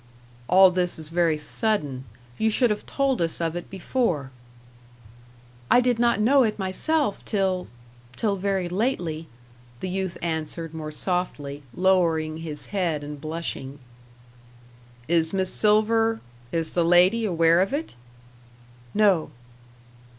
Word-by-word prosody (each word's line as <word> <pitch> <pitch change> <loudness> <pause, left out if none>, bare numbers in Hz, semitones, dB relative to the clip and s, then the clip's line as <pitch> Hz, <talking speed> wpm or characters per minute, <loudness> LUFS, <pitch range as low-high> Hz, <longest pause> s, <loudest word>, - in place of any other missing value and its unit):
"All 185 +1 +7
this 180 -1 0
is 155 -1 -3
very 165 -2 +1
sudden. 150 - -1 0.3
You 220 - +2
should 235 +1 +2
have 210 - -4
told 275 -6 0
us 165 -1 -1
of 165 -1 -2
it 175 - -6
before." 185 - -2 1.4
"I - - +6
did 250 -2 +1
not 235 -3 +3
know 265 +6 +4
it 220 -4 +1
myself 210 +7 0
till 190 -3 -1 0.5
till 205 - 0
very 195 -1 -1
lately," 175 -6 -2 0.5
the 185 - -4
youth 190 -1 -3
answered 160 0 -3
more 155 -1 -5
softly, 150 -4 -3
lowering 165 -3 +1
his 150 -3 -7
head 170 -7 -1
and 145 -1 -8
blushing. 155 -3 -4 1.3
"Is 165 0 +2
Miss 190 -1 0
Silver 225 +1 +3 0.3
is 165 -1 -2
the 175 - +2
lady 180 +7 +4
aware 170 -3 +3
of 195 - 0
it?" 295 +4 -3 1.0
"No." 195 -8 +3
180 Hz, 130 wpm, -24 LUFS, 160-210 Hz, 1.4 s, All